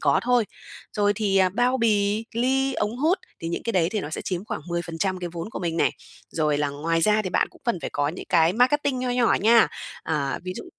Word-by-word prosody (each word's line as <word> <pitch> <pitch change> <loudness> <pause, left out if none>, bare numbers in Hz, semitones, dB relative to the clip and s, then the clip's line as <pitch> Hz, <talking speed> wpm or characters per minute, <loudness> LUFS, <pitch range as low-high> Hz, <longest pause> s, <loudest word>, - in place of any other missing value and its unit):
có 140 -2 +3
thôi. 245 -2 +3 0.5
Rồi 205 -1 +2
thì, 205 -2 0
à, 190 -1 +5
bao 245 +6 +1
bì, 210 -1 +2
ly, 265 +3 +1
ống 210 +3 -1
hút, 325 +8 +2 0.2
thì 165 - -4
những 170 - -3
cái 230 - -2
đấy 170 -3 +2
thì 215 - -1
nó 150 - -6
sẽ - - -4
chiếm 180 0 -3
khoảng 215 - -4
10% 170 +2 -2
cái 175 -1 -4
vốn 170 +4 -6
của - - -5
mình 170 -2 -2
nè. - - +3 0.4
Rồi 150 -2 0
là 145 - +1
ngoài 160 +4 -1
ra 215 +4 +3
thì 185 - -4
bạn - - +1
cũng - - -20
cần 235 -6 0
phải - - -4
có 145 0 0
những 170 - -6
cái 165 0 +4
marketing 255 +4 +2
nho 250 0 -1
nhỏ 245 -1 +3
nha. 225 +2 +6 0.3
À, 145 -3 -1
ví 185 - -3
dụ - - -7
200 Hz, 245 wpm, -24 LUFS, 165-235 Hz, 0.5 s, nha